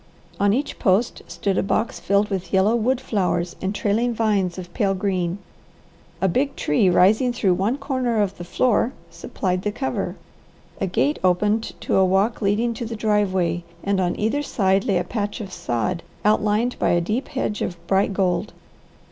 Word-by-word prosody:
On 200 0 +3
each 275 +7 -2
post 200 +5 +1
stood 195 -1 -1
a - - +3
box 215 +3 -1
filled 200 +1 +1
with 185 -3 -3
yellow 195 +4 +3
wood 245 +3 +1
flowers 180 -8 -1
and 190 +2 -2
trailing 230 +4 0
vines 200 -5 +1
of 180 -1 -8
pale 200 -5 +1
green. 185 -2 -1 0.8
A 190 - +3
big 270 +10 0
tree 180 +6 +2
rising 215 +8 +4
through 200 -6 +2
one 200 +9 0
corner 255 -5 -1
of 200 -2 0
the - - -5
floor 235 +6 +1 0.2
supplied 185 -2 -3
the 210 - -1
cover. 265 +5 -3 0.6
A 195 - 0
gate 285 - +1
opened 210 +5 +1
to - - +1
a 190 - +5
walk 195 +6 +2
leading 215 +4 +1
to 230 - -5
the 230 - -5
driveway, 190 -6 +1 0.2
and 200 -1 +1
on 175 -1 -1
either 225 +7 +1
side 195 -8 +1
lay 195 - +2
a 175 - 0
patch 205 0 -3
of 195 -4 -7
sod, 170 +2 -2 0.2
outlined 215 +3 +2
by - - +2
a 175 - +3
deep 220 +10 -2
hedge 215 -6 -3
of 175 - -2
bright 195 +3 +2
gold. 185 +1 0
200 Hz, 180 wpm, -22 LUFS, 185-225 Hz, 0.8 s, a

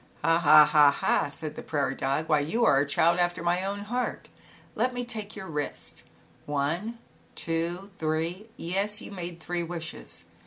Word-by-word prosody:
" - - -29
Ha^ha 155 -2 +7
ha 150 -2 +6
ha," 140 - +1
said 150 +1 -5
the - - -6
prairie 140 -3 -1
dog, 140 +4 -1
"why, 150 - +4
you 195 +12 +1
are 135 -10 +5
a 145 - +1
child 170 +4 +3
after 175 -1 0
my 175 +2 +1
own 200 +1 -3
heart. 245 +4 -3 0.4
Let 250 0 0
me 245 0 -2
take 220 -3 -5
your 200 -3 -7
wrist, 150 -4 -4 0.5
one, 160 +11 -1 0.4
two, 170 +4 -2
three, 165 +7 -2
yes, 195 +5 -1
you - - -9
made 175 -3 -6
three 175 +1 -3
wishes. 165 -1 -6
170 Hz, 170 wpm, -28 LUFS, 155-200 Hz, 0.5 s, Ha^ha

